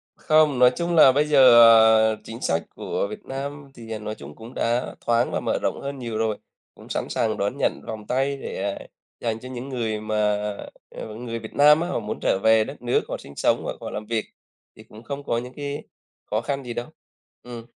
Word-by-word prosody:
Không, 155 -4 +3
nói 125 0 +7
chung 170 0 -1
là 145 -4 +8
bây 145 +3 +2
giờ, 135 -5 +7 0.6
à, - - -20
chính 115 +2 -9
sách 80 0 0
của - - -2
Việt 105 - -9
Nam 140 +1 -6
thì, 115 -3 -11
à, 110 - -4
nói 105 0 -5
chung 70 +1 -11
cũng 115 +3 -11
đã 120 +2 -1
thoáng 120 +1 +2
và - - -1
mở - - -1
rộng - - -2
hơn 140 0 -5
nhiều 115 -3 -4
rồi, 110 -1 0 0.4
cũng - - -15
sẵn - - -2
sàng 110 -2 0
đón 100 +7 -2
nhận - - 0
vòng 110 -1 -7
tay 135 +2 0
để, - - -5 0.2
à, - - -12 0.3
dành 115 -2 -2
cho 125 - -10
những 130 +1 -7
người 115 -5 -2
mà, 110 0 -3 0.7
ờ, 110 -1 -8
người 115 0 -5
Việt 110 -1 -10
Nam 150 +2 +6
á, 175 - -1
họ 180 - -2
muốn 105 -2 -5
trở 95 - +1
về 110 0 +5
đất 135 +5 -9
nước, 120 0 +1
họ - - -3
sinh 70 - -13
sống - - +1
hoặc - - -4
họ - - -5
làm 105 - -6
việc, 110 0 -2 0.5
thì - - -14
cũng 110 +2 -15
không 140 +3 -6
có 115 - -1
những 125 +2 -6
cái 145 +1 -5 0.5
khó 110 - +1
khăn 140 +2 -3
gì 120 -2 -6
đâu. 120 +1 -4 0.6
Ừm. 120 -2 -9
120 Hz, 230 wpm, -24 LUFS, 110-140 Hz, 0.7 s, là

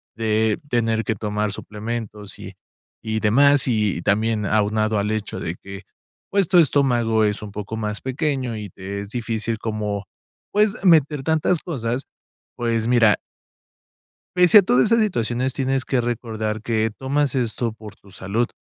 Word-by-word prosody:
de 110 -1 +1
tener 115 -2 +1
que 110 - -1
tomar 105 0 -2
suplementos 105 -1 -6
y - - -9 0.5
y 110 0 -2
demás, 140 +6 +4
y 105 -8 0
también 105 +2 +1
aunado 110 +1 +1
al 105 +1 -1
hecho 110 -1 -3
de 85 - -4
que, 100 +2 -10 0.5
pues, 200 -4 +1
tu 185 - +4
estómago 120 -8 +3
es 105 0 0
un 105 -2 -8
poco 105 +2 -5
más 105 -1 -3
pequeño 130 -3 -2
y 105 -1 -6
te 95 +3 -7
es 100 - -8
difícil 115 -1 -2
como, 105 -2 -3 0.5
pues, 210 0 +3
meter 150 -6 +4
tantas 160 +3 +1
cosas, 125 -5 -3 0.5
pues, 115 -1 0
mira 115 -4 +5 1.2
pese 180 +2 +7
a - - +10
todas 130 - +3
esas 230 - +5
situaciones, 130 - 0
tienes 135 -1 -1
que 130 -3 +1
recordar 110 -2 -3
que 110 -1 0
tomas 140 0 0
esto 120 -2 -1
por 110 -1 -12
tu 100 - -20
salud, 105 +6 -1
115 Hz, 155 wpm, -22 LUFS, 105-130 Hz, 1.2 s, a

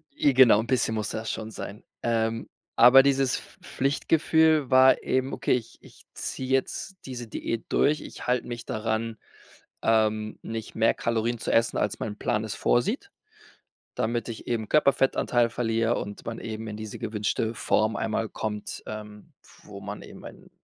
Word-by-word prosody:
I 140 -2 +3
genau, 125 -5 +7
'n 115 - -3
bisschen 120 -3 +1
musste 110 +1 -3
das 110 - -3
schon 110 0 -5
sein. 100 0 -8 0.2
Ähm, 115 -1 0 0.3
aber 130 +3 +8
dieses 135 -2 +2
Pf - - -13
Pflichtgefühl 155 +1 +2
war 130 0 +6
eben: 130 +1 0
„Okay, - - +1
ich 120 -3 -3
ich - - -18
ziehe 130 0 -5
jetzt 135 +8 -1
diese 120 -3 -6
Diät 115 +1 -4
durch. 150 +1 +2
Ich - - -9
halt 125 -1 +1
mich 120 -1 -6
daran, 110 +1 -2 0.6
ähm, 110 -1 +1
nicht 115 -1 -6
mehr 115 0 +3
Kalorien 115 +1 -1
zu - - -2
essen, 115 0 +2
als 105 - -1
mein 105 -1 -4
Plan 105 - -1
es 110 - -5
vorsieht.“ 235 - 0 0.8
Damit 115 +1 -1
ich 115 - -8
eben 110 -3 -2
Körperfettanteil 135 -4 +3
verliere 115 0 0
und 100 0 -6
man 115 0 -5
eben 110 0 -6
in 105 0 -6
diese 110 -2 -7
gewünschte 110 +1 -1
Form 110 0 +1
einmal 110 0 -1
kommt, 105 -1 -5
ähm, 105 -1 -9 0.3
wo - - -10
man - - -6
eben - - -12
einen - - -12
115 Hz, 165 wpm, -26 LUFS, 110-130 Hz, 0.8 s, aber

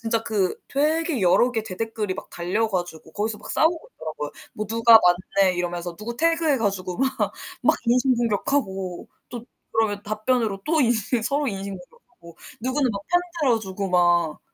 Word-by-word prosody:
진짜 225 0 0
그 200 -5 0
되게 310 - +1
여러 190 +7 +4
개 225 -2 -1
대댓글이 215 -1 -3
막 - - -9
달려 195 +6 -1
가지고 175 -4 -4
거기서 210 +1 -2
막 - - -7
싸우고 320 +1 +1
있더라고요. 155 -2 -6 0.2
뭐 215 - -4
'누가 230 +1 +7 0.4
맞네.' 190 -2 +5
이러면서 175 0 -3
누구 230 +4 -6
태그해 330 -1 +2
가지고 190 -4 -2
막 270 - +3 0.5
막 - - +4
인신공격하고 235 -6 0 0.2
또 240 -2 -7 0.3
그러면 215 -2 0
답변으로 215 -1 -1
또 315 0 +2
인신 235 -2 +1
서로 285 +5 +1
인신공격하고 190 -5 -8 0.2
누구는 260 +1 0
막 200 - -4
편 355 0 +3 0.2
들어주고 210 -7 0
막. 175 -3 +2
215 Hz, 345 characters per minute, -24 LUFS, 185-250 Hz, 0.5 s, 누가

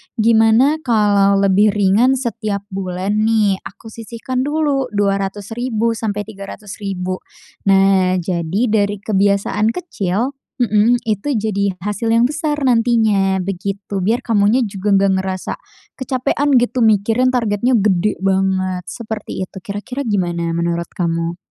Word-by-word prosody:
"gimana 230 +6 +4
kalau 205 -3 +3
lebih 195 +1 +3
ringan 210 +6 +3
setiap 220 -5 -3
bulan 190 0 -3 0.2
nih 210 -4 +2
aku 220 +3 -12
sisihkan 230 +3 -5
dulu 290 -3 0
Rp200.000 205 +4 -1
sampai 210 -2 -3
Rp300.000." 195 -2 -6 0.5
Nah 195 -1 +4
jadi 175 +1 -2
dari 205 -1 +1
kebiasaan 200 +2 +1
kecil 235 - -2 0.3
mhm, 225 +1 +3
itu 220 +6 -1
jadi 200 -2 -1
hasil 210 +2 -2
yang 230 - +4
besar 300 +3 -1
nantinya 225 -6 +2
begitu, 195 +1 -4
biar 225 +7 +1
kamunya 220 +2 +3
juga 200 0 -4
nggak 195 0 +3
ngerasa, 190 -1 -4 0.4
kecapekan 270 +2 0
gitu 245 +1 +1
mikirin 220 +4 +3
targetnya 235 0 +1
gede 205 -1 +1
banget, 190 -1 0
seperti 220 -4 -6
itu, 190 - -14
kira-kira 205 +8 -5
gimana 175 -6 -1
menurut 170 0 -2
kamu? 170 -1 -1
205 Hz, 120 wpm, -18 LUFS, 195-230 Hz, 0.5 s, gimana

